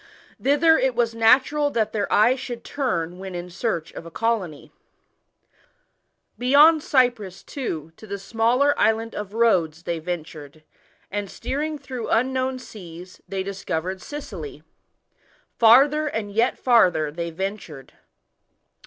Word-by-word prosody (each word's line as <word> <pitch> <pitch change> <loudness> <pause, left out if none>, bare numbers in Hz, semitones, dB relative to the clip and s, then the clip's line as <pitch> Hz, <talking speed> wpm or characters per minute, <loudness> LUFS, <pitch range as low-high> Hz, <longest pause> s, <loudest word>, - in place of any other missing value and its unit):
Thither 320 +4 +4
iv 260 -2 +1
was 235 -1 +1
natural 260 +6 +3
that 220 -5 -1
their 205 -2 -2
eyes 240 +5 +4
should 240 -2 -7
turn 180 - -3
vhen 190 -1 -7
in 175 0 -6
search 170 -4 -3
of - - -8
a 170 - -10
colony. 190 -6 -2 1.7
Beyond 295 +6 +6
Cyprus, 240 -10 0
too, 165 - -5
to 220 - -13
the 200 0 -4
smaller 235 +7 +2
island 225 +1 +1
of 210 0 -6
Rhodes 175 -9 +2
they 170 -1 -3
ventured, 155 -3 -7 0.5
and 205 0 -3
steering 300 +8 -3
through 255 -4 -6
un 255 +4 +1
known 260 0 -1
seas, 180 -6 -11
they 195 -1 -2
discovered 190 -1 -4
Sicily. 185 - -8 1.0
Farther 280 +7 +5
and 220 -7 -4
yet 225 +4 +1
farther 180 - +3
they 170 +2 -4
ventured. 165 -6 -6
220 Hz, 130 wpm, -23 LUFS, 175-255 Hz, 1.7 s, Beyond